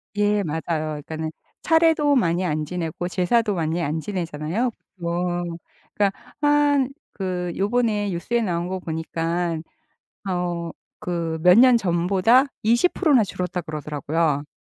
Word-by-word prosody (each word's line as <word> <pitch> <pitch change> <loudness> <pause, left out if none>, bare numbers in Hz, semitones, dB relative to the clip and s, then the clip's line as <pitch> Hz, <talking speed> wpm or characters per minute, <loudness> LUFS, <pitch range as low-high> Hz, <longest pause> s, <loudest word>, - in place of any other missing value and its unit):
예 205 0 +2
맞아요. 160 -1 -3 0.4
그러니까는 160 0 -4 0.3
차례도 320 -3 +4
많이 180 -6 +2
안 155 -2 -1
지내고 175 +1 -4
제사도 205 +4 +1
많이 165 0 -1
안 155 0 -1
지내잖아요? 170 +4 -2 0.3
보통 175 0 -2 0.4
그러니까 200 -2 +2 0.3
한 290 -2 +3 0.3
그 180 -2 -3
요번에 210 -1 +1
뉴스에 195 +7 -1
나온 175 -5 -1
거 190 +1 -3
보니까 165 0 -2 0.7
어 175 -2 -2 0.3
그 165 -2 -3
"몇 180 +3 +7
년 250 0 +7
전보다 195 +7 +3 0.2
20%나 260 - +3
줄었다." 180 -2 -3
그러더라고요. 150 -1 -2
180 Hz, 270 characters per minute, -23 LUFS, 165-220 Hz, 0.7 s, 몇